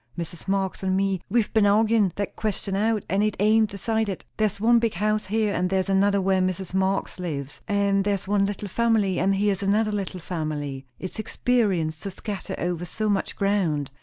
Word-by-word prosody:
"Mrs. 170 +1 -6
Marx 195 -1 -1
and 190 0 +1
me, 195 -2 0
we've 225 +1 +1
ben 215 -3 +4
arguin' 215 -1 +3
that 205 -1 -3
question 205 -2 -2
out, 215 +1 +1
and 195 +1 +1
it 215 0 +1
ain't 215 +1 +4
decided. 205 0 -2
There's 215 -2 0
one 235 +2 +5
big 230 -5 0
house 215 +3 0
here, 215 0 +1
and 180 +1 0
there's 190 0 0
another 200 +1 +3
where 190 0 +2
Mrs. 185 0 -2
Marx 190 0 0
lives; 145 -6 -5
and 200 -1 +2
there's 200 -2 -1
one 200 0 +2
little 205 0 -4
family, 215 -3 +1
and 195 +2 +2
here's 200 -1 +1
another 210 +2 +2
little 195 -3 -3
family. 150 -6 -4
It's 185 +3 -6
expensive 195 -10 0
to 200 - -4
scatter 195 +1 -5
over 175 -1 -2
so 215 +5 -2
much 200 -1 -1
ground. 180 -9 0
195 Hz, 190 wpm, -25 LUFS, 185-210 Hz, -, one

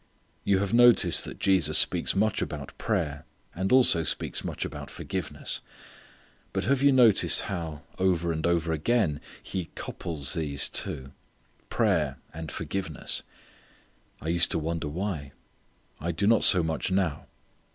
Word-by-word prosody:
You 100 - +2
have 100 +1 -2
noticed 120 0 +6
that - - -8
Jesus 85 -6 +3
speaks - - +3
much 105 +1 +1
about 75 -3 -5
prayer 75 -1 -2 0.3
and 95 +2 -2
also 125 -10 +5
speaks 75 - -3
much - - -4
about - - -7
forgiveness. - - -4 0.9
But - - -1
have 130 +6 +1
you 140 0 +5
noticed 120 -6 +4
how, 80 -6 -5 0.2
over 90 -3 +1
and 80 0 -1
over 85 -1 +1
again 80 -2 0 0.2
He 95 -3 -4
couples 75 -6 -4
these 70 -3 -1
two 65 +1 -3 0.6
prayer - - +1 0.2
and 80 -1 -7
forgiveness? 95 -7 -2 1.0
I 80 - -5
used 85 0 +3
to - - -1
wonder 80 0 -3
why. 75 -4 -4 0.7
I 85 +3 -2
do 85 +5 -2
not 115 +1 +4
so 90 -2 +7
much 80 +3 -2
now. 95 -6 -1
85 Hz, 140 wpm, -27 LUFS, 80-95 Hz, 1.0 s, so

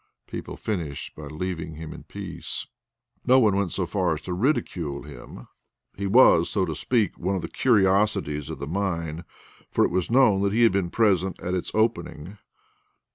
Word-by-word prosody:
People - - -7
finished 85 -10 -4
by 75 -1 -8
leaving 80 +1 -4
him 80 0 -7
in - - -10
peace. - - -6 0.6
No 130 +1 +5
one 105 -5 +4
went 100 -3 0
so 95 - -1
far 90 -2 0
as 75 - -8
to 90 - -5
ridicule 90 - -1
him. 70 -4 -11 0.5
He 100 +1 -3
was, 95 -6 +6
so 95 -3 +1
to 80 - -3
speak, 110 - 0
one 95 +3 -1
of 90 - -3
the - - -3
curiosities 100 - +2
of - - -5
the - - -5
mine, 85 -2 -3 0.4
for - - +3
it - - -1
was 90 -1 0
known 115 -6 +4
that 100 0 +1
he 120 +2 +3
had 115 - +6
been 95 -2 0
present 95 -3 +1
at 90 - -2
its 90 - -2
opening. 105 -4 -1
95 Hz, 185 wpm, -25 LUFS, 80-105 Hz, 0.6 s, was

